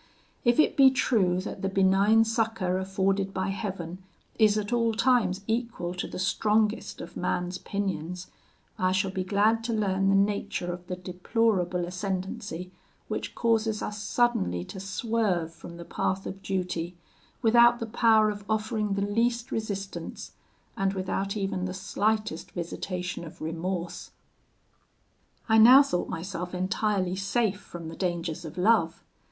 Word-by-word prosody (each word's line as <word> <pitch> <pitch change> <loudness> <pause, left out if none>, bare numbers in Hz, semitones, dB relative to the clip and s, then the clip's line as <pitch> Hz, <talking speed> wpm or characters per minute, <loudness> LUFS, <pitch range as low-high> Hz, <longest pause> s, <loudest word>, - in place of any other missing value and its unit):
If 240 +2 +3
it 310 - +4
be 270 -1 +8
true 210 -9 +2
that 190 - -6
the 195 - 0
benign 195 +3 +4
succour 225 -5 0
afforded 195 +1 0
by 190 +1 -1
Heaven 190 -4 -4 0.4
is 215 -1 +5
at 210 +2 -2
all 230 -2 +2
times 230 -6 +2
equal 225 -6 -2
to 180 - -4
the - - -7
strongest 210 +3 +1
of - - -9
man's 180 0 -2
pinions, 180 -3 -3 0.5
I 185 0 +2
shall 190 0 +1
be 185 0 -2
glad 210 +4 +2
to 235 - -1
learn 195 -3 +1
the 195 - +4
nature 195 -3 0
of 175 0 -10
the 180 - -3
deplorable 180 0 0
ascendancy 185 -1 -4 0.4
which - - -4
causes 225 -2 +1
us 210 0 -4
suddenly 95 - +1
to 190 - -7
swerve 195 -4 -1
from 170 +1 -11
the 170 - -8
path 190 +2 -2
of 195 0 -6
duty, 180 -3 -3 0.5
without 235 +1 +6
the 230 - -3
power 220 -1 +4
of 205 0 -8
offering 215 -1 0
the 200 - -1
least 235 +3 0
resistance, 200 -3 -5 0.4
and 195 0 0
without 195 +1 -2
even 195 -2 -2
the 185 0 -4
slightest 210 -2 -1
visitation 180 +1 -4
of 165 +1 -11
remorse. 170 +2 -4 1.4
"I 220 -1 +5
now 255 +5 +9
thought 180 -10 -2
myself 180 +1 -5
entirely 185 0 0
safe 200 +1 0
from 170 -2 -9
the 165 - -7
dangers 175 -3 -2
of 160 +3 -9
love. 180 -4 +2
195 Hz, 145 wpm, -27 LUFS, 180-220 Hz, 1.4 s, now